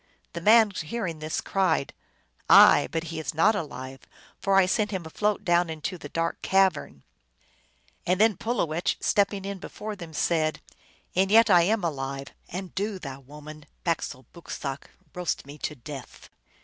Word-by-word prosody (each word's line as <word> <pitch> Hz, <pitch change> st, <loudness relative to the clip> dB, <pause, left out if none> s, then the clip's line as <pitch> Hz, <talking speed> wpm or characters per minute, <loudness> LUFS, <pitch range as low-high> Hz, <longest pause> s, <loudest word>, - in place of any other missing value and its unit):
The 170 Hz, -, -5 dB
man, 220 Hz, +2 st, +6 dB
hearing 170 Hz, -1 st, -4 dB
this, 155 Hz, +1 st, -3 dB
cried, 185 Hz, -7 st, 0 dB, 0.3 s
" -, -, -38 dB
Aye; -, -, +8 dB
but 165 Hz, 0 st, -2 dB
he 160 Hz, -, -4 dB
is 155 Hz, 0 st, -4 dB
not 200 Hz, +8 st, +4 dB
alive, 135 Hz, -, -6 dB, 0.4 s
for 195 Hz, -1 st, +1 dB
I 195 Hz, -1 st, +6 dB
sent 210 Hz, +3 st, 0 dB
him 190 Hz, -5 st, -4 dB
afloat 210 Hz, +5 st, -1 dB
down 175 Hz, -1 st, +3 dB
into 160 Hz, +3 st, -5 dB
the -, -, -9 dB
dark 165 Hz, 0 st, -2 dB
cavern! 190 Hz, -, +1 dB, 0.5 s
" -, -, -28 dB
And 180 Hz, +1 st, +2 dB
then 220 Hz, -1 st, +4 dB
Pulowech, 175 Hz, -8 st, -1 dB
stepping 200 Hz, -1 st, +1 dB
in 200 Hz, -1 st, -5 dB
before 210 Hz, +3 st, -7 dB
them, 170 Hz, -5 st, -10 dB
said, 155 Hz, 0 st, 0 dB, 0.3 s
" -, -, -33 dB
And 190 Hz, +1 st, +3 dB
yet 225 Hz, +1 st, +6 dB
I 175 Hz, -2 st, +7 dB
am 220 Hz, -3 st, +1 dB
alive. 135 Hz, -3 st, -3 dB, 0.2 s
And 185 Hz, +1 st, -6 dB
do 200 Hz, +1 st, -2 dB
thou, 135 Hz, -6 st, -8 dB
woman, 150 Hz, +2 st, -12 dB, 0.2 s
bak 165 Hz, -2 st, 0 dB
sole 130 Hz, -2 st, -7 dB
boksooc!" 140 Hz, -4 st, -6 dB, 0.3 s
(roast 180 Hz, -5 st, -3 dB
me 145 Hz, +2 st, -11 dB
to 150 Hz, -, -4 dB
death). 135 Hz, 0 st, -10 dB
170 Hz, 175 wpm, -26 LUFS, 150-195 Hz, 0.5 s, Aye